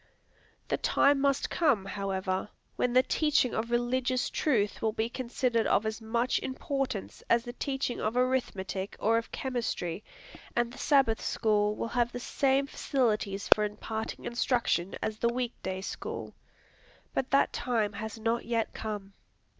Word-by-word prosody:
The - - 0
time 280 -1 +3
must 275 -1 +1
come, 275 - +2
however, 195 -1 -2 0.3
when 250 - +1
the 255 +1 +6
teaching 300 -5 +2
of 225 +2 -1
religious 245 +1 +1
truth 215 -9 +1
will 220 -1 +1
be 225 +1 -1
considered 240 -2 0
of 215 - +3
as 220 +1 -3
much 235 +3 +1
importance 260 -4 -3
as 235 0 +4
the 240 - -6
teaching 270 -2 -2
of 220 +3 -1
arithmetic 200 -7 -1
or 225 +2 +3
of 230 - -9
chemistry, 225 -8 -2 0.5
and 240 0 +1
the - - -10
Sabbath 270 -6 +3
School 210 -1 +2
will 230 - -3
have 240 -1 +1
the 245 - -5
same 270 +2 +2
facilities 215 -8 0
for 210 - -1
imparting 220 +1 -4
instruction 235 -7 +1
as 215 0 -2
the 235 - +3
week 245 -1 -2
day 190 0 -3
school. - - -5 0.8
But 265 - -1
that 275 - +3
time 225 -5 0
has 220 +1 -5
not 230 +1 0
yet 230 -1 -1
come. 205 -3 -5
235 Hz, 155 wpm, -30 LUFS, 210-255 Hz, 0.8 s, the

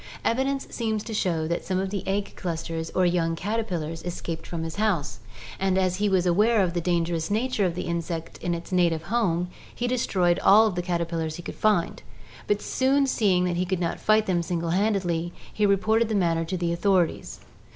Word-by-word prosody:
Evidence 270 +3 0
seems 220 -3 -2
to 225 - -6
show 170 -6 0
that 170 +1 -2
some 185 - -1
of 190 0 -1
the 200 -2 -2
egg 200 +1 -1
clusters 165 -2 -4
or 185 - +3
young 170 -2 +1
caterpillars 175 -5 -3
escaped 170 -2 -5
from 165 -2 -4
his 165 +2 -5
house, 180 - 0 0.4
and 190 -1 +1
as 185 -1 +1
he 205 +1 +1
was 185 -2 +2
aware 210 +4 +3
of 175 -2 -1
the 175 - -1
dangerous 170 -1 0
nature 220 -1 +1
of 170 - -4
the 180 - -3
insect 170 -1 -4
in 175 -1 -1
its 170 +2 -8
native 170 -3 +2
home, 180 -7 +1 0.3
he 245 - -2
destroyed 190 -8 +1
all 215 +2 +6
the 180 -1 -2
cater 175 -1 -1
pillars 165 -2 -3
he 175 - -8
could - - -6
find, 210 -6 +1 0.5
but 205 0 0
soon 275 +2 +2
seeing 200 -8 +2
that 175 -1 0
he 180 - +1
could 185 0 -1
not 170 - -2
fight 215 0 +3
them 175 -2 +1
single 170 -1 -2
handed, 200 +2 +1 0.5
he 210 - +1
reported 220 +3 +2
the 220 - 0
matter 165 -4 +1
to 185 +3 -3
the 170 -1 -1
authorities. 180 -1 0
180 Hz, 205 wpm, -25 LUFS, 170-210 Hz, 0.5 s, all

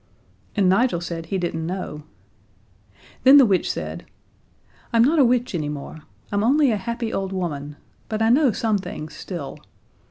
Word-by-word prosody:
And 200 -4 +3
Nigel 195 0 +3
said 165 -1 -6
he 195 - -1
didn't 170 -3 -2
know. 175 -3 -5 1.2
Then 265 +2 +8
the 275 - +8
witch 195 -4 +1
said: - - -6 0.8
"I'm 230 0 +5
not 305 +6 +3
a - - +7
witch 245 -1 +1
anymore. 150 -2 -4 0.3
I'm 205 0 +1
only 275 +2 +4
a 215 - +1
happy 235 +3 -4
old 195 -1 -2
woman, 150 -6 -4 0.3
but 215 - -2
I 225 0 +3
know 265 +1 +4
some 215 0 0
things 155 -4 -7
still. 170 -7 -7
195 Hz, 160 wpm, -23 LUFS, 170-235 Hz, 1.2 s, Then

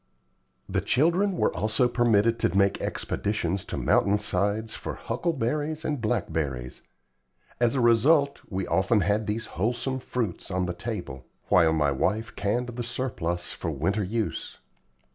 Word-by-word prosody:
The - - 0
children 175 +9 +2
were - - +1
also 110 +6 +2
permitted 115 -2 +3
to 95 -4 +1
make 100 0 +3
expeditions 100 -3 -2
to - - -4
mountain 100 +1 +3
sides 105 +2 -1
for - - -5
huckleberries 155 0 -2
and 145 -5 -1
blackberries. 70 - -2 0.8
As 120 +1 +2
a 130 - +2
result, 140 +5 +4
we 95 -1 -2
often 100 +3 +2
had 105 +4 +1
these 110 +2 -2
wholesome 120 +7 -2
fruits 120 -7 -3
on 90 -1 0
the 90 - -2
table, 85 - -6 0.2
while 85 -3 +5
my 75 -3 +2
wife 105 +11 -1
canned 120 +5 -1
the 120 0 -4
surplus 90 -9 -3
for 85 - -4
winter 85 +8 0
use. 110 +3 -3
110 Hz, 145 wpm, -27 LUFS, 90-120 Hz, 0.8 s, while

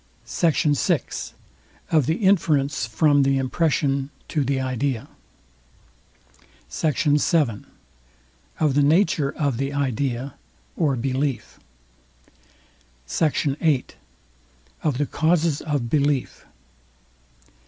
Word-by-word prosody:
SECT. 155 -3 +1
VI. - - +1 0.9
OF 155 -6 +3
THE 160 - +2
INFERENCE 145 - +2
FROM 145 +6 +3
THE 135 0 +2
IMPRESSION 135 0 0 0.2
TO 150 -3 0
THE 135 0 0
IDEA. 130 -1 -2 1.6
SECT. 150 - -1
VII. 145 - +1 0.9
OF 150 -3 +2
THE 145 - +3
NATURE 155 -1 +3
OF 140 -5 0
THE 135 +2 -2
IDEA 135 -1 -2 0.4
OR 150 -5 +1
BELIEF. 130 0 -2 1.5
SECT. 155 - 0 0.2
VIII. 150 -6 +2 1.0
OF 150 -5 0
THE 145 - +1
CAUSES 160 0 +1
OF 145 -6 -2
BELIEF. 140 0 0
140 Hz, 95 wpm, -23 LUFS, 135-155 Hz, 1.6 s, OF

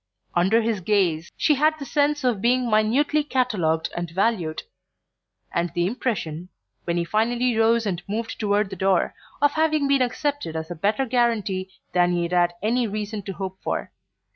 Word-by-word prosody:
Under 195 +7 +3
his 220 -3 -1
gaze 175 -4 +1
she 305 - +3
had 305 +2 +2
the 280 - -7
sense 290 +2 +1
of 240 -6 +1
being 250 +2 +2
minutely 255 +8 +2
catalogued 210 - 0
and 175 -1 -3
valued; 180 -3 0 0.9
and 170 -1 0
the 175 0 +1
impression, 180 -7 -3 0.4
when 170 0 -1
he 170 - +1
finally 235 +5 +1
rose 225 +1 +3
and 180 -4 -2
moved 225 +2 -3
toward 205 -1 +1
the - - -4
door, 190 -1 +1 0.3
of 290 - +5
having 310 -2 +1
been 275 -1 +3
accepted 265 - -1
as 160 +1 -4
a - - -4
better 210 +10 0
guarantee 220 -6 0 0.2
than 175 0 +3
he 175 0 0
had 170 - -3
had 175 -1 +3
any 235 +2 +1
reason 210 0 -4
to 195 0 -6
hope 190 0 -6
for. - - -3
215 Hz, 175 wpm, -24 LUFS, 180-250 Hz, 0.9 s, of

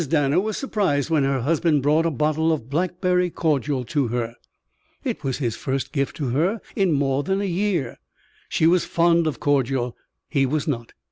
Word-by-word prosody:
Danner 145 +1 +3
was 215 +2 -2
surprised 185 - 0
when 150 -4 +3
her 135 -2 0
husband 150 +1 +2
brought 155 +3 +3
a - - +2
bottle 155 +2 +1
of 135 -5 -3
blackberry 180 +2 +1
cordial 145 -5 0
to 145 -2 0
her. 115 0 -2 0.7
It - - -3
was 130 -2 -1
his 120 -5 -2
first 130 +2 -3
gift 140 -2 -1
to 140 -5 -2
her 170 - +1 0.2
in 195 -3 +2
more 140 -2 +1
than 190 +5 -1
a - - -1
year. 180 - -1 0.5
She 160 - +1
was 175 +2 +4
fond 170 -1 +2
of 140 -7 -3
cordial. 135 -3 0 0.3
He 135 -3 +1
was 155 +3 -1
not. 120 -6 -3
150 Hz, 185 wpm, -23 LUFS, 135-170 Hz, 0.7 s, was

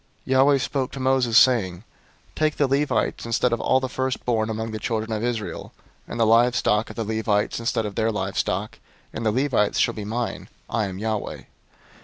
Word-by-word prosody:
003:044 - - -6
Yahweh 135 +2 +5
spoke 130 0 -2
to 135 - -7
Moses, 130 -3 +2
saying, 115 -10 +4
003:045 90 - -16 0.5
"Take 155 -1 +1
the 145 - +3
Levites 140 -1 0
instead 115 +1 +1
of 115 - -1
all 130 - +3
the 130 - -3
firstborn 125 -3 -1
among 110 0 -3
the 110 - -4
children 110 0 -2
of 110 0 -2
Israel, 120 -3 -4 0.3
and 115 - -6
the 115 - +4
livestock 115 -1 +3
of - - -9
the 115 - -2
Levites 110 -1 0
instead 115 -1 -1
of 105 - -4
their 110 +2 0
livestock; 95 0 -2 0.3
and - - -4
the 110 - +2
Levites 125 -4 +1
shall - - +2
be 105 - -6
mine. 115 +3 -4 0.2
I 110 -2 -1
am 95 -1 -6
Yahweh. 110 0 -3
115 Hz, 195 wpm, -24 LUFS, 110-130 Hz, 0.5 s, Yahweh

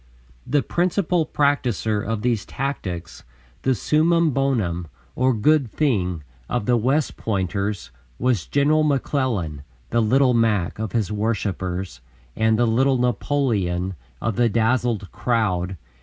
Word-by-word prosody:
The 145 +2 +2
principal 175 -2 +1
practiser 125 -8 +1
of 110 +1 -3
these 120 -4 +1
tactics, 90 - -5 0.4
the 130 -1 +2
summum 160 - +2
bonum, 110 -12 0 0.3
or 130 +1 +3
"good 130 +3 +2
thing," 95 - 0 0.3
of - - -1
the 125 - +3
"West 130 +6 +1
Pointers" 100 -1 -2 0.3
was 120 -8 0
General 150 +2 +3
McClellan, 130 - 0 0.3
"the 115 - +3
Little 125 +3 +3
Mac" 110 -6 +1
of 110 -2 -4
his 110 -5 0
worshipers 95 - -2 0.3
and 110 0 +2
"the 120 - +3
Little 130 +4 +3
Napoleon" 110 -7 0 0.3
of 115 -4 -2
the 120 -1 +3
dazzled 115 -2 0
crowd. 95 -6 0
115 Hz, 125 wpm, -22 LUFS, 100-135 Hz, 0.4 s, or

